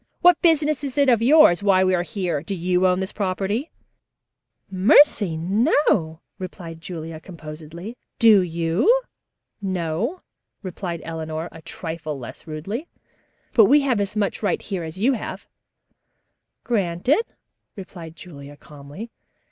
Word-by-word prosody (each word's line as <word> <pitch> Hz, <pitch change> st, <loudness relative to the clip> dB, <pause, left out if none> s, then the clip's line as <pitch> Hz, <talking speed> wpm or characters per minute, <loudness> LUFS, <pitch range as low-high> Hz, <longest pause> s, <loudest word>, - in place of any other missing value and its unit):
"What 355 Hz, 0 st, +5 dB
business 305 Hz, -4 st, +2 dB
is 275 Hz, -1 st, -5 dB
it 280 Hz, -2 st, +4 dB
of 235 Hz, -3 st, +4 dB
yours 250 Hz, -, +6 dB
why 195 Hz, -2 st, +4 dB
we 185 Hz, 0 st, +2 dB
are 175 Hz, -, +2 dB
here? 180 Hz, -5 st, -3 dB
Do 195 Hz, +5 st, -5 dB
you 180 Hz, +1 st, +1 dB
own 180 Hz, +1 st, +1 dB
this 190 Hz, -, -4 dB
property?" 205 Hz, -, -2 dB, 1.0 s
"Mercy, 200 Hz, -, +5 dB
no," 185 Hz, -, +1 dB, 0.2 s
replied 170 Hz, -3 st, -8 dB
Julia 165 Hz, -2 st, -7 dB
composedly. 165 Hz, +4 st, -9 dB, 0.2 s
"Do 225 Hz, -5 st, +6 dB
you?" 170 Hz, -, +1 dB, 0.7 s
"No," 190 Hz, -, -2 dB, 0.4 s
replied 175 Hz, -2 st, -5 dB
Eleanor 160 Hz, 0 st, -5 dB
a 165 Hz, -, -12 dB
trifle 160 Hz, -2 st, -6 dB
less 130 Hz, +5 st, -10 dB
rudely, 195 Hz, -, -5 dB, 0.7 s
"but 225 Hz, -4 st, +7 dB
we 290 Hz, +7 st, +5 dB
have 255 Hz, -7 st, +1 dB
as 200 Hz, +1 st, -3 dB
much 210 Hz, -2 st, -1 dB
right 200 Hz, -5 st, 0 dB
here 195 Hz, -4 st, -5 dB
as 160 Hz, +1 st, -7 dB
you 240 Hz, +8 st, +2 dB
have." 235 Hz, -, -6 dB, 1.2 s
"Granted," 210 Hz, -, +1 dB, 0.5 s
replied 170 Hz, -4 st, -10 dB
Julia 145 Hz, -5 st, -11 dB
calmly. 150 Hz, +11 st, -11 dB
185 Hz, 130 wpm, -22 LUFS, 165-225 Hz, 1.2 s, but